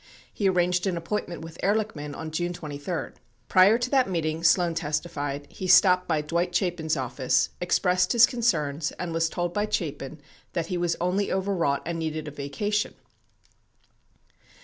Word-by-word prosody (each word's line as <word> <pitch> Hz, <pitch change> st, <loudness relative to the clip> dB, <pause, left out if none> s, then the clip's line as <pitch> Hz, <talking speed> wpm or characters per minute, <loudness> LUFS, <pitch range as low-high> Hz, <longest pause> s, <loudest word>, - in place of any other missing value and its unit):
He 200 Hz, -2 st, +1 dB
arranged 180 Hz, 0 st, +1 dB
an 180 Hz, -2 st, -1 dB
appointment 170 Hz, 0 st, -4 dB
with 165 Hz, 0 st, -10 dB
Ehrlichman 200 Hz, -8 st, -1 dB
on 160 Hz, -1 st, -6 dB
June 175 Hz, +2 st, -2 dB
23. 155 Hz, +1 st, -5 dB, 0.4 s
Prior 190 Hz, +4 st, +6 dB
to 245 Hz, +1 st, -2 dB
that 265 Hz, -6 st, +3 dB
meeting, 165 Hz, -2 st, -2 dB
Sloan 170 Hz, 0 st, +4 dB
testified, 145 Hz, -3 st, -3 dB
he 185 Hz, -, -5 dB
stopped 180 Hz, 0 st, +6 dB
by 160 Hz, -3 st, +1 dB
Dwight 170 Hz, +4 st, -1 dB
Chapin's 165 Hz, -4 st, 0 dB
office, 130 Hz, 0 st, +1 dB
expressed 180 Hz, 0 st, +2 dB
his 235 Hz, 0 st, +8 dB
concerns, 165 Hz, -, 0 dB
and 175 Hz, -2 st, -5 dB
was 165 Hz, 0 st, +1 dB
told 175 Hz, 0 st, -2 dB
by 205 Hz, +2 st, 0 dB
Chapin 150 Hz, -6 st, -3 dB, 0.3 s
that 170 Hz, -2 st, -1 dB
he -, -, +1 dB
was 175 Hz, -1 st, 0 dB
only 185 Hz, +3 st, 0 dB
overwrought 185 Hz, -7 st, 0 dB
and 170 Hz, 0 st, -3 dB
needed 155 Hz, -1 st, -3 dB
a -, -, -5 dB
vacation. 175 Hz, +10 st, -2 dB
170 Hz, 155 wpm, -26 LUFS, 155-185 Hz, 0.4 s, his